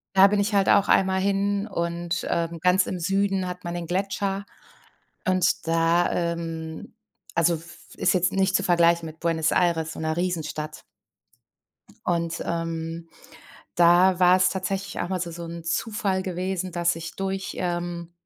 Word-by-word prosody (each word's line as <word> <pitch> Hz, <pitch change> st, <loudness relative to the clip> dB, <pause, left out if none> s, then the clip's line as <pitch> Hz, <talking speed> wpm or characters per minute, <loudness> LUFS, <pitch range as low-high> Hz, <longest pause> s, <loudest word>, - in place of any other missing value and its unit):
Da 195 Hz, +1 st, +8 dB
bin 205 Hz, +1 st, +1 dB
ich 205 Hz, +1 st, 0 dB
halt 200 Hz, -1 st, +3 dB
auch 200 Hz, 0 st, +4 dB
einmal 190 Hz, 0 st, +3 dB
hin 200 Hz, +1 st, 0 dB
und, 170 Hz, -2 st, -3 dB
ähm, 170 Hz, 0 st, -1 dB
ganz 180 Hz, +1 st, +4 dB
im 180 Hz, -, -4 dB
Süden 195 Hz, +1 st, 0 dB
hat 180 Hz, 0 st, -7 dB
man 170 Hz, -, -4 dB
'nen 175 Hz, -1 st, -4 dB
Gletscher. 195 Hz, +2 st, -2 dB, 0.8 s
Und 185 Hz, -1 st, +3 dB, 0.2 s
da, 165 Hz, +1 st, +2 dB
ähm, 165 Hz, 0 st, -4 dB, 0.4 s
also 170 Hz, +1 st, +3 dB
f 165 Hz, +2 st, -11 dB
f -, -, -14 dB
ist 185 Hz, -, +2 dB
jetzt 180 Hz, 0 st, +2 dB
nicht 190 Hz, 0 st, +1 dB
zu 200 Hz, -, +2 dB
vergleichen 170 Hz, -2 st, +3 dB
mit 160 Hz, 0 st, -9 dB
Buenos 165 Hz, -2 st, +1 dB
Aires, 165 Hz, -3 st, +1 dB
so -, -, -9 dB
'ner 160 Hz, 0 st, -2 dB
Riesenstadt. 160 Hz, -4 st, -3 dB, 1.2 s
Und, 170 Hz, -1 st, -1 dB
ähm, 165 Hz, 0 st, -3 dB, 0.7 s
da 175 Hz, +2 st, +5 dB
war 180 Hz, 0 st, +6 dB
es 185 Hz, 0 st, +4 dB
tatsächlich 190 Hz, +1 st, -3 dB
auch -, -, -2 dB
mal 185 Hz, -1 st, -1 dB
so 175 Hz, -1 st, -3 dB
so 170 Hz, +1 st, -7 dB
'n 170 Hz, 0 st, -7 dB
Zufall 195 Hz, +2 st, -1 dB
gewesen, 185 Hz, 0 st, -3 dB
dass 170 Hz, -1 st, +1 dB
ich 165 Hz, +1 st, -7 dB
durch, 195 Hz, 0 st, -3 dB
ähm, 175 Hz, -1 st, -3 dB
175 Hz, 165 wpm, -25 LUFS, 170-190 Hz, 1.2 s, Da